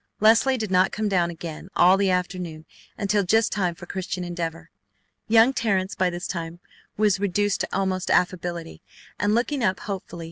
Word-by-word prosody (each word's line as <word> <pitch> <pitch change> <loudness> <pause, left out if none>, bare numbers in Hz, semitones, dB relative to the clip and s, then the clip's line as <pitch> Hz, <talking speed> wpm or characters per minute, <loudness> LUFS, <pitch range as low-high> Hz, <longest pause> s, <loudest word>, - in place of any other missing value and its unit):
Leslie 230 +5 +4
did 215 -4 -4
not 185 +1 +3
come 215 0 -2
down 180 -4 +1
again 165 +1 -8
all 180 +2 +6
the 195 0 +1
afternoon 180 -3 -2 0.3
until 205 0 +1
just 220 +4 +2
time 180 -4 -1
for 175 - -11
Christian 185 0 -4
Endeavor. 170 -2 -5 0.6
Young 225 +4 +5
Terrence 200 -6 0
by 185 -1 +1
this 175 +1 -5
time 170 -1 -5 0.4
was 210 -3 +2
reduced 205 +1 0
to - - -1
almost 190 -1 -1
affability, 175 -2 -1 0.4
and 205 +1 +2
looked 240 +5 0
up 215 -9 0
hopefully. 190 -4 -6
185 Hz, 170 wpm, -24 LUFS, 175-205 Hz, 0.6 s, all